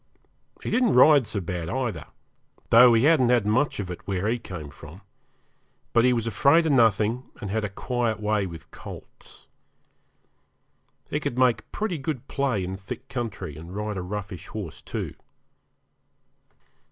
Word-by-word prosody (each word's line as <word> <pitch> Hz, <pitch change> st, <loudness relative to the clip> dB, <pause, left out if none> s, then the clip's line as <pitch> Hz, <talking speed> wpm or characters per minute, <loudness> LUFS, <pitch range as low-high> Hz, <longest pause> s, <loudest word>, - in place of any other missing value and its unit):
He -, -, -3 dB
didn't 250 Hz, -3 st, +3 dB
ride 140 Hz, -1 st, +6 dB
so 100 Hz, -, -2 dB
bad 85 Hz, -2 st, -4 dB
either, 125 Hz, -2 st, -2 dB, 0.7 s
though 120 Hz, +2 st, +9 dB
he 115 Hz, -, +3 dB
hadn't 145 Hz, -5 st, +5 dB
had 120 Hz, -4 st, +3 dB
much 110 Hz, +7 st, +1 dB
of 95 Hz, -3 st, -4 dB
it 90 Hz, -, -9 dB
where 95 Hz, 0 st, -1 dB
he 120 Hz, +2 st, 0 dB
came 80 Hz, -9 st, -8 dB
from; 80 Hz, +6 st, -13 dB, 0.9 s
but 115 Hz, -, +5 dB
he 125 Hz, -, +5 dB
was 115 Hz, -2 st, 0 dB
afraid 140 Hz, +8 st, +4 dB
of 160 Hz, -, +2 dB
nothing, 115 Hz, -1 st, +2 dB
and 100 Hz, -, -5 dB
had 110 Hz, +1 st, -1 dB
a 105 Hz, -, -2 dB
quiet 120 Hz, +2 st, -2 dB
way 105 Hz, -2 st, 0 dB
with 80 Hz, -2 st, -11 dB
colts. -, -, -12 dB, 1.7 s
He -, -, 0 dB
could 120 Hz, -, -3 dB
make 125 Hz, -2 st, +2 dB
pretty 200 Hz, -7 st, -2 dB
good 135 Hz, -2 st, -4 dB
play 130 Hz, -8 st, 0 dB
in 95 Hz, +1 st, -4 dB
thick 100 Hz, +7 st, -8 dB
country, 110 Hz, -, -5 dB
and 85 Hz, +5 st, -10 dB
ride 105 Hz, 0 st, -3 dB
a 95 Hz, -, -3 dB
roughish 95 Hz, -1 st, -6 dB
horse, -, -, -7 dB
too. -, -, -5 dB
110 Hz, 160 wpm, -25 LUFS, 95-125 Hz, 1.7 s, though